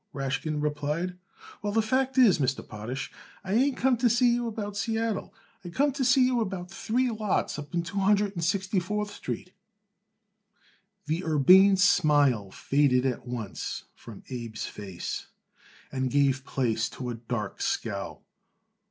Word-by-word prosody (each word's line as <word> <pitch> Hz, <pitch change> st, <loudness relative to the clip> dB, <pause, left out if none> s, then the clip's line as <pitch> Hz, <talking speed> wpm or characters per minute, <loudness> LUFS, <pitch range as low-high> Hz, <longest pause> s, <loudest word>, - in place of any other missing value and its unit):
Rashkin 145 Hz, +2 st, -2 dB
replied. 150 Hz, +4 st, -2 dB, 0.5 s
"Well, 205 Hz, 0 st, -2 dB
the 225 Hz, +1 st, +2 dB
fact 260 Hz, +4 st, 0 dB
is, 235 Hz, -10 st, +6 dB
Mr. 135 Hz, -1 st, -1 dB
Potash, 120 Hz, +5 st, -5 dB, 0.3 s
I 190 Hz, +1 st, -3 dB
ain't 265 Hz, +4 st, +2 dB
come 255 Hz, -1 st, +2 dB
to 240 Hz, +1 st, +3 dB
see 240 Hz, +1 st, +4 dB
you 240 Hz, 0 st, -1 dB
about 210 Hz, -2 st, -5 dB
Seattle. 225 Hz, 0 st, -2 dB, 0.3 s
I 175 Hz, -, -7 dB
come 280 Hz, +10 st, +2 dB
to 275 Hz, 0 st, -2 dB
see 260 Hz, 0 st, +5 dB
you 250 Hz, -2 st, +1 dB
about 185 Hz, -4 st, -4 dB
three 245 Hz, +6 st, 0 dB
lots 215 Hz, -8 st, -1 dB
up 145 Hz, +3 st, -7 dB
in 170 Hz, -, +1 dB
Two 200 Hz, +4 st, -4 dB
Hundred 205 Hz, +1 st, +3 dB
and 170 Hz, -3 st, -4 dB
Sixty 190 Hz, +3 st, +1 dB
fourth 210 Hz, +3 st, -3 dB
Street." 180 Hz, -, -6 dB, 1.5 s
The 160 Hz, +4 st, -1 dB
urbane 185 Hz, +6 st, +6 dB
smile 145 Hz, -, +3 dB
faded 135 Hz, +3 st, +2 dB
at 125 Hz, -2 st, -2 dB
once 115 Hz, -5 st, -5 dB
from 115 Hz, -4 st, -12 dB
Abe's 115 Hz, -3 st, -5 dB
face 95 Hz, -4 st, -6 dB, 0.6 s
and 130 Hz, -1 st, -1 dB
gave 135 Hz, -1 st, +2 dB
place 115 Hz, -4 st, 0 dB
to 125 Hz, -1 st, -5 dB
a -, -, -3 dB
dark 115 Hz, -3 st, -5 dB
scowl. -, -, -3 dB
180 Hz, 150 wpm, -27 LUFS, 135-215 Hz, 1.5 s, is